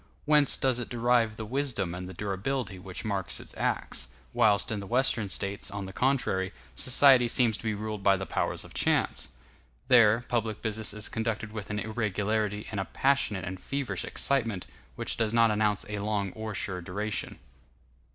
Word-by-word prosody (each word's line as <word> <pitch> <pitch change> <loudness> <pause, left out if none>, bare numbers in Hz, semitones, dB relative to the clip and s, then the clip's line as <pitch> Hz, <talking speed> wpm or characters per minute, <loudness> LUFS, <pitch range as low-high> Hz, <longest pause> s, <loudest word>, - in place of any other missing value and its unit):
Whence 150 -1 +4
does 130 -2 +1
it 120 - -5
derive 120 -2 +2
the 110 - -5
wisdom 125 -7 -1
and 90 +1 -6
the - - -8
durability 100 +1 -3
which 95 +3 -7
mark 100 -4 -1
its - - -9
acts, - - -1 0.3
whilst 105 -1 +3
in 105 - -1
the 100 - -7
Western 120 -3 +1
States, 100 +2 -2
on 100 -1 -5
the 95 - -8
contrary, 100 -8 0 0.2
society 130 -1 +6
seems 115 -2 +4
to - - -12
be 110 -2 -1
ruled 105 0 -4
by 95 0 +4
the 95 - -4
powers - - -1
of - - -13
chance? - - +1 0.6
There, 120 -1 +6
public 115 -3 -1
business 110 0 -1
is 105 0 -2
conducted 110 -1 -3
with 105 -2 -6
an 105 - -2
irregularity 105 -1 -1
and 105 - -3
a 95 - -1
passionate 135 -8 +1
and 95 0 -5
feverish 140 +5 -3
excitement, 115 -9 0 0.3
which - - -2
does 115 -1 0
not 115 -1 +5
announce 105 -1 +1
a 105 0 -4
long 100 -2 -1
or 110 -1 -5
sure 90 -1 -3
duration. 100 +4 -3
110 Hz, 180 wpm, -29 LUFS, 100-120 Hz, 0.6 s, society